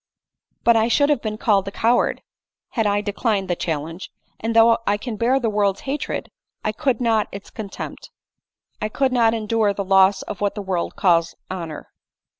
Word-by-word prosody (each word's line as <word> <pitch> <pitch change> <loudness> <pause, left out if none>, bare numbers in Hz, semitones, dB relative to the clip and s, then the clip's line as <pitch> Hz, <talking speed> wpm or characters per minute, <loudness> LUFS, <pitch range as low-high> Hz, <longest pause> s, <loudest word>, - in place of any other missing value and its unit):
" - - -51
But 235 - +5
I 225 0 +3
should 285 +5 +3
have 290 - +1
been 215 -1 -3
called 200 -4 +2
a - - -3
coward 230 +4 +1 0.5
had 225 -4 0
I 205 0 +1
de 205 -1 -4
clined 205 -4 0
the 175 - 0
challenge; 165 +2 -4 0.3
and 225 +1 -2
though 230 0 +6
I 205 - +3
can 230 +1 -5
bear 245 +5 +2
the 240 - -1
world's 205 -2 +1
hatred, 280 +2 -4 0.3
I 215 - 0
could 265 +3 0
not 225 -3 +2
its 200 0 -9
contempt; 210 -3 -7 0.7
I 215 - -1
could 265 +4 +1
not 230 -2 +3
endure 215 -2 +1
the 200 - -3
loss 195 +1 +4
of 210 - -7
what 205 -1 0
the 210 - -4
world 185 -3 -2
calls 170 -3 +2 0.2
honor." 165 -5 -6
210 Hz, 195 wpm, -22 LUFS, 195-230 Hz, 0.7 s, though